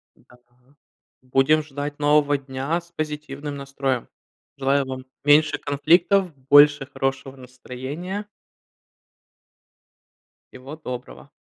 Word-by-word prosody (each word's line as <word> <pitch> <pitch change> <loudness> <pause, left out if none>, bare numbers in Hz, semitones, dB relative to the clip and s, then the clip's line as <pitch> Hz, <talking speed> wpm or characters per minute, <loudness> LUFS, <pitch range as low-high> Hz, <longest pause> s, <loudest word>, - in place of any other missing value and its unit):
Да. 125 - -22 0.8
Будем 135 +4 +2
ждать 145 0 -6
нового 145 0 +3
дня 135 +4 -3
с 170 0 -19
позитивным 150 -2 -5
настроем. 135 -2 -3 0.5
Желаю 140 +1 +1
вам 130 0 -7 0.2
меньше 150 +1 +5
конфликтов, 175 +6 +2 0.2
больше 145 -1 +7
хорошего 135 0 -3
настроения. 130 - -7 2.3
Всего 130 +4 -10
доброго. 125 -2 -8
145 Hz, 90 wpm, -23 LUFS, 135-150 Hz, 2.3 s, больше